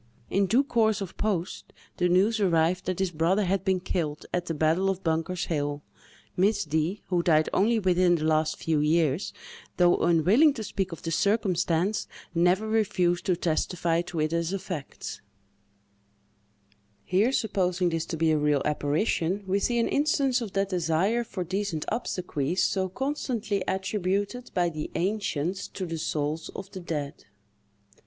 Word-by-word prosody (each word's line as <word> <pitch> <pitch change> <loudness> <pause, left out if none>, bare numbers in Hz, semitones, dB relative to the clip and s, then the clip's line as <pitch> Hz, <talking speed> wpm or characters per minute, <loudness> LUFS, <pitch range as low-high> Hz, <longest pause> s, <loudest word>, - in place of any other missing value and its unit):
In 195 0 +2
due 245 +8 +4
course 225 -5 +2
of 195 -3 -6
post, 190 -4 -3 0.2
the 180 0 +2
news 200 +5 +3
arrived 180 -1 +2
that 185 -1 -1
this 190 -2 0
brother 175 +6 +1
had 190 0 0
been 190 -2 +1
killed 160 -4 -3
at 175 0 -1
the 165 - -2
battle 160 +5 +2
of 190 -1 -3
Bunker's 165 +2 -1
hill. 145 -2 -2 0.5
Miss 200 +2 +2
D——, 160 +6 -1
who 180 -2 +2
died 155 -2 +3
only 225 +4 +3
within 180 -3 +3
the 155 - -3
last 155 0 +1
few 160 -2 0
years, 155 +2 +1 0.5
though 175 -1 +5
unwilling 190 - +4
to 220 - -4
speak 195 -2 -3
of 165 - -8
the 165 - -3
circumstance, 190 -1 +1 0.3
never 180 +5 +2
refused 185 -5 +1
to 180 - +3
testify 170 0 0
to 175 -1 -5
it 155 +1 0
as 170 +1 0
a 195 - -1
fact. 180 -7 -7 1.8
Here, 200 +7 +2
supposing 185 -7 +1
this 165 -1 -2
to 165 - -4
be 160 0 +2
a 155 - +2
real 145 -2 +2
apparition, 160 +6 0
we 190 +1 +1
see 240 +4 0
an 230 - +2
instance 280 -3 +1
of 220 -5 -5
that 195 0 0
desire 180 +6 +1
for 190 -5 -5
decent 185 -2 -2
obsequies 180 - -1
so 190 -1 0
constantly 235 -4 -2
attributed 200 +5 -1
by 175 -2 +2
the 155 -2 -5
ancients 185 -2 -1
to 190 - -5
the 165 -2 -4
souls 155 +1 -2
of 195 0 -7
the 190 - -7
dead. 150 -4 -5
180 Hz, 160 wpm, -27 LUFS, 165-200 Hz, 1.8 s, though